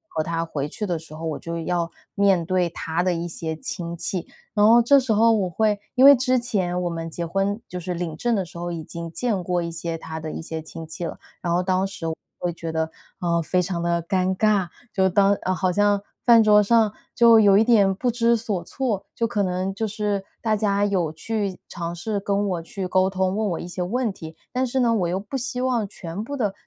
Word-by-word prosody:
和 160 - +2
他 165 +1 -2
回 145 -3 -3
去 210 - -4
的 175 -4 -1
时 155 -1 -12
候， 160 +1 -6
我 160 -2 -3
就 170 0 -5
要 170 0 -1 0.2
面 195 -4 +3
对 180 0 +1
他 165 0 -2
的 180 -1 +1
一 170 +1 -3
些 160 -1 -4
亲 170 +2 -5
戚。 180 +1 -3 0.3
然 205 - +3
后 235 +1 +8
这 275 +4 +6
时 255 -3 -1
候 225 +2 +5
我 205 -5 +1
会 210 +3 +1 0.2
因 255 - +6
为 280 0 +11
之 255 0 +2
前 195 -7 -1
我 - - 0
们 165 -1 -4
结 170 +1 -4
婚 195 +5 -1
就 180 - -6
是 180 0 -4
领 170 -2 -3
证 235 +7 0
的 195 -3 -1
时 175 - -17
候 175 0 -3
已 165 -2 -5
经 170 +1 -7
见 210 -1 -1
过 175 0 0
一 170 - -4
些 165 0 -4
他 160 0 -7
的 155 0 -5
一 - - -5
些 160 0 -5
亲 160 +1 -9
戚 160 +2 -7
了， 165 - -4 0.2
然 175 - -2
后 175 +1 +2
当 185 +1 +1
时 195 -4 -8
我 160 0 -1 0.2
会 175 -1 -2
觉 165 0 -5
得， 160 0 -1 0.3
嗯， 170 -1 +1
非 175 +3 0
常 180 -1 -1
地 170 0 0
尴 185 +2 0
尬， 205 -4 +3 0.3
就 190 -1 +3
当 195 +2 +4
嗯， 185 - 0
好 185 0 +1
像 205 +1 +2 0.2
饭 230 -2 +7
桌 210 -1 +6
上 220 0 +3 0.2
就 230 -1 +7
有 200 -2 +6
一 215 - +6
点 205 -5 +4
不 245 +5 0
知 235 0 +3
所 210 -6 -3
措， 225 -1 -3
就 230 - 0
可 230 -3 -1
能 185 0 -1
就 220 +3 -2
是 205 -2 -2 0.2
大 220 -2 +1
家 205 -1 +1
有 185 -6 0
去 200 +3 -3
尝 170 0 -5
试 200 +4 -2
跟 200 +1 0
我 175 -3 -2
去 190 +2 -5
沟 185 +1 +3
通， 190 0 0
问 215 0 0
我 170 - -2
一 - - -6
些 180 +1 -5
问 225 +4 -1
题， 160 -3 -10 0.2
但 255 +1 0
是 260 +2 -1
呢， 235 -2 +3
我 190 -6 +1
又 180 +2 -1
不 205 +6 -7
希 250 -1 -3
望 245 -5 +1
全 185 0 -6
部 285 +5 -5
的 210 -6 0
190 Hz, 260 characters per minute, -23 LUFS, 170-215 Hz, 0.3 s, 为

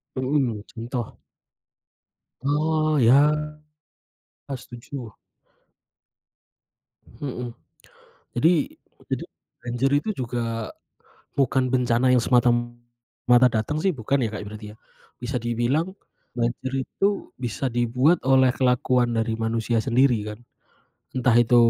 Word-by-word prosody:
Mhm, 130 -5 0
contoh? 120 0 -5 1.2
Oh, 155 +2 +1
iya, 135 +5 +6 1.2
eee, 135 - -3
setuju. 120 -1 -9 2.1
Hmm. 125 -4 -4 0.8
Jadi, 145 +8 +4 0.6
itu - - -1 0.4
banjir 125 +3 0
itu 220 - -4
juga 115 -2 -3 0.7
bukan 130 -1 +2
bencana 125 0 +2
yang 125 - +4
semata-mata 120 0 +2
datang 115 +7 -1
sih, 195 - +3
bukan 130 +1 0
ya 115 - 0
Kak, 105 - -4
berarti 105 0 -9
ya. - - -18 0.5
Bisa 125 +1 -2
dibilang, 120 +7 0 0.5
banjir 120 +2 -1 0.2
itu 200 0 -1
bisa 125 +1 -3
dibuat 125 +7 +2
oleh 130 -1 +5
kelakuan 125 -1 +2
dari 115 0 0
manusia 115 +1 0
sendiri 130 0 +3
kan, 105 - -7 0.8
entah 125 -1 +3
itu 120 0 +4
125 Hz, 100 wpm, -24 LUFS, 120-135 Hz, 2.1 s, iya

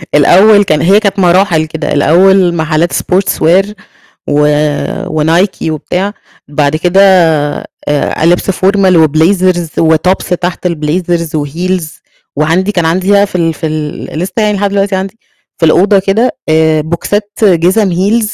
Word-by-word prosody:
الأول 205 +8 +5
كان 155 -6 0
هي 195 +4 +4
كانت 200 -2 -2
مراحل 175 -3 +2
كده، 160 0 -5
الأول 175 +5 +3
محلّات 160 +1 -1
sports 190 +1 0
wear 185 +5 +3 0.6
و 150 0 +2 0.8
وNike 175 +5 0
وبتاع، 180 +6 -3 0.3
بعد 145 0 -1
كده 180 +4 +1 0.9
آآ 145 +2 -1
لبس 175 +3 +1
formal 190 0 +1
وblazers 175 +2 +1 0.3
وtops 180 +2 -1
تحت 180 0 -3
الblazers 170 +1 -2
وheels، 175 +5 -3 0.5
وعندي 165 +7 0
كان 175 -5 -1
عندي 185 +4 0
بقى 200 0 +3
في 195 - -11
ال 165 -2 0
في 160 - -5
ال 155 -1 -5
لسه 180 +3 -4
يعني 210 -2 +1
لحد 200 +1 -1
دلوقتي 195 0 -1
عندي، 195 +4 -5 0.4
في 165 - +1
الأوضة 195 +5 +3
كده، 200 +6 -1
آآ، 155 -1 +2
بوكسات 205 +6 -3
جِزم 190 +2 +2
heels 210 +5 0
180 Hz, 140 wpm, -10 LUFS, 160-195 Hz, 0.9 s, الأول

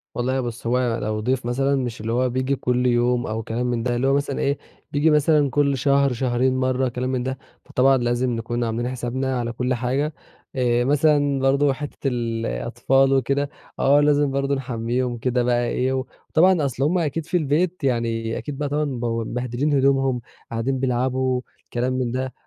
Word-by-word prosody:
والله 130 +2 0
بُصّ، 120 -1 -5
هو 125 +2 +2
أنا 120 -2 0
لو 110 0 -1
ضيف 125 +3 -1
مثلًا 135 +3 +1
مش 125 -5 -3
اللي 110 +1 -3
هو 125 +2 +1
بييجي 130 +2 0
كلّ 125 -1 0
يوم 120 0 +2
أو 110 +1 -3
كلام 115 +3 -2
من 120 -2 -1
ده، 120 0 0
اللي 125 +3 +1
هو 135 - +3
مثلًا 140 0 -1
إيه، 140 0 +1 0.3
بييجي 145 +2 +3
مثلًا 150 -1 +3
كلّ 140 +1 +1
شهر، 140 0 +3
شهرين 130 +1 +1
مرّة، 130 0 +1
كلام 125 +1 -3
من 130 -1 -1
ده، 130 +1 -3 0.3
فطبعًا 135 +1 +3
لازم 120 +1 0
نكون 120 +1 -2
عاملين 115 +1 -2
حسابنا 130 +1 -2
على 120 -1 -2
كل 125 +2 -1
حاجة. 130 +5 -1 0.4
آآ، 120 -2 +2
مثلًا 145 0 +2
برضه 135 +1 +3
حِتّة 145 0 -5
الأطفال 120 - 0
وكده، 140 +2 +1 0.3
آه، 140 +2 +5
لازم 145 -1 +3
برضه 140 +1 0
نحمّيهم 125 -1 -2
كده 125 +1 0
بقى 120 0 +1
إيه 130 +2 0
و 130 0 -1 0.2
وطبعًا، 175 -1 +4
أصْل 135 0 -2
هُم 165 +6 +2
أكيد 165 -1 -1
في 180 - 0
البيت 165 +3 0
يعني، 115 -3 -1
أكيد 145 -2 -6
بقى 145 0 -2
طبعًا 150 +1 0
مبو 120 -4 -2
مبهدلين 125 +5 -2
هدومهم، 135 -2 +2 0.3
قاعدين 120 +3 -1
بيلعبوا، 130 0 0 0.3
كلام 125 +2 0
من 130 -2 -1
ده. 130 0 -3
130 Hz, 185 wpm, -23 LUFS, 120-140 Hz, 0.4 s, آه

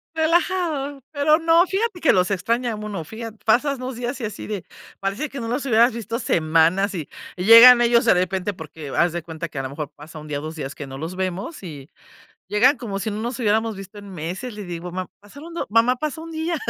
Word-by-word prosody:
Relajado, 320 -4 0
pero 305 +1 +4
no, 330 +1 +4
fíjate 390 -1 -2
que 320 - +5
los 180 0 +2
extraña 230 +5 0
uno, 210 -6 -5
fijat 225 +5 -7
pasas 260 +5 +2
2 255 0 -5
días 245 +3 -4
y 235 - -3
así 210 -1 -6
de, 205 -5 -5 0.3
parece 200 +10 -2
que 275 - -7
no 230 - -4
los 250 +4 -2
hubieras 235 -1 +4
visto 230 0 -4
semanas 165 +3 +2
y 160 -5 -4 0.3
y 180 - -3
llegan 235 +3 +10
ellos 235 0 +4
de - - +5
repente 185 +2 -1
porque 160 -3 -9
haz 170 +4 +1
de 175 -1 -4
cuenta 160 0 -6
que 155 - -11
a 135 - -2
la 130 - -4
mejor 145 +1 -5
pasa 155 +2 -11
1 155 - -11
día, 145 -1 -3
ó - - -8
2 155 +1 -6
días 140 -2 -5
que 145 - -7
no 135 0 -8
los 165 +5 -5
vemos 190 - -4
y 150 -5 -9 0.6
llegan 250 +7 +4
como 220 -5 -5
si 215 +2 -3
no 210 +1 -4
nos 235 +2 -4
hubiéramos 220 -1 +1
visto 195 +1 -10
en 200 -1 -11
meses. 180 +9 -5
Le 210 -1 -7
digo: 175 0 -6
"Ma 185 +1 -5
pasaron 285 +11 -12
do 340 - -3
mamá, 230 +3 +4
pasó 305 +3 -4
un 330 - -9
día", 325 +2 -2
215 Hz, 235 wpm, -22 LUFS, 175-260 Hz, 0.6 s, llegan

